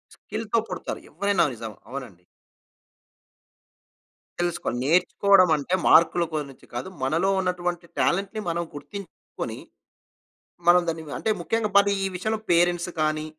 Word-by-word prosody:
స్కిల్‌తో 225 +1 -2
పుడతారు 180 - -5
ఎవరైనా. 200 -4 +2
నిజం. 110 -1 -7 0.2
అవునండి. 125 -10 -8 2.2
తెలుసుకోవాలి. 175 -8 -1
నేర్చుకోవడం 185 +3 +4
అంటే, 150 +6 -4
మార్కుల 170 +1 +6
గురించి 145 -3 -5
కాదు. 120 +9 -4
మనలో 165 +8 +2
ఉన్నటువంటి 175 -2 -2
టాలెంట్‌ని 200 +4 0
మనం 170 +1 -1
గుర్తించుకొని. 200 +6 -8 1.1
మనం 180 0 +7
దాన్ని 160 -1 -2 0.2
అంటే 220 - -1
ముఖ్యంగా 225 +3 0
పది 200 0 +5
ఈ - - +1
విషయంలో 220 +4 -1
పేరెంట్స్ 175 +1 +3
కానీ, 155 0 0
175 Hz, 110 wpm, -25 LUFS, 155-195 Hz, 2.2 s, మనం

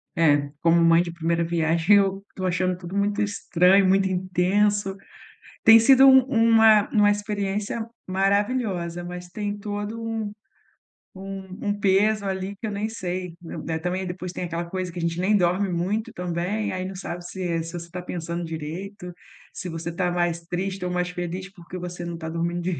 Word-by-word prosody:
É, 145 -3 +3
como 170 0 +4
mãe 165 0 +6
de 170 - -6
primeira 170 0 0
viagem, 165 +3 +3
eu 195 0 +1
estou 185 -1 -4
achando 185 0 0
tudo 180 +1 -8
muito 205 0 +1
estranho, 195 -1 +3
muito 195 0 +3
intenso, 190 +2 +1 0.7
tem 225 0 +9
sido 265 +3 +7
um 265 -1 +8
uma 225 -4 +5
uma 210 -2 +4
experiência 205 +1 -2 0.2
maravilhosa, 195 -2 0
mas 180 0 -7
tem 205 +2 -4
todo 205 +2 -5
um 225 -2 -3 0.8
um 195 +1 -7
um 205 - +1
peso 200 +2 +3
ali 190 +1 -3
que 220 - -6
eu - - -3
nem 205 +1 -2
sei, 185 -5 -4
né. 165 -1 -4
Também 180 +3 -2
depois 180 0 -5
tem 180 - -4
aquela 170 0 -3
coisa 180 +1 -4
que 180 - -7
a - - -3
gente 170 +1 -1
nem 205 +3 +3
dorme 185 +1 +2
muito 185 +6 -1
também, 180 +4 -2
aí 185 0 -3
não 190 - -6
sabe 175 -2 -6
se 175 -2 -3
se 165 +1 -8
você 170 -1 -7
tá 180 - -5
pensando 170 -1 -4
direito, 170 +4 -6 0.4
se 180 - -6
você 165 0 -5
tá 180 +1 0
mais 175 -1 0
triste 185 +2 -3
ou 180 - -2
mais 180 0 -1
feliz, 180 +2 -5
porque 175 -1 -10
você 175 0 -6
não 170 -1 -5
tá 160 -1 -6
dormindo, 170 +1 -2
185 Hz, 180 wpm, -24 LUFS, 175-205 Hz, 0.8 s, tem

